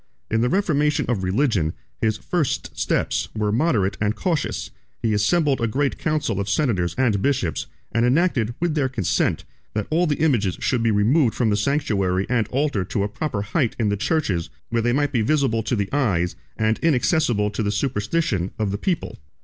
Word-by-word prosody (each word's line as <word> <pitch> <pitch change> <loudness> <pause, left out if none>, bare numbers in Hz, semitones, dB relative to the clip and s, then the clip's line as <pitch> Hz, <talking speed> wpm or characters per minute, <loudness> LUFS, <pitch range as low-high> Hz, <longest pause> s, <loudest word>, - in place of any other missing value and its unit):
In 115 0 +2
the 125 - +2
reformation 150 -5 +1
of 110 -6 -1
religion, 95 - +1 0.3
his 110 -1 +1
first 160 -1 -2
steps - - 0
were 105 -1 0
moderate 110 - +1
and 105 +1 +1
cautious: 170 -6 -2 0.3
he 110 -2 0
assembled 140 +6 +2
a 115 - +2
great 135 +5 -1
council 155 - -1
of 100 0 -2
senators 100 - +1
and 115 -7 +2
bishops, 135 - 0 0.2
and 115 +1 +1
enacted, 125 -4 +2
with 175 -2 0
their 145 -4 +1
consent, 90 -9 0 0.3
that 105 -1 -1
all 170 +3 +3
the 145 - +1
images 120 - +1
should 125 -3 0
be 115 - +2
removed 110 +5 +3
from 115 -4 +1
the - - +3
sanctuary 100 -7 0
and 120 -3 +1
altar 135 -7 0
to 100 +3 -2
a - - 0
proper 105 -1 -3
height 120 +3 0
in 110 -3 +1
the 100 - +1
churches 100 - -1 0.2
where 115 0 +1
they 120 +1 +1
might 145 +2 +1
be 120 -5 +1
visible 130 -2 +1
to 120 - -1
the 100 -3 -1
eyes, 95 -12 +1 0.2
and 110 0 +1
inaccessible 125 - +2
to 105 - -3
the 105 -1 0
superstition, 105 - -1
of 105 -3 -1
the 100 - -3
people. 180 - -2
115 Hz, 190 wpm, -23 LUFS, 105-145 Hz, 0.3 s, all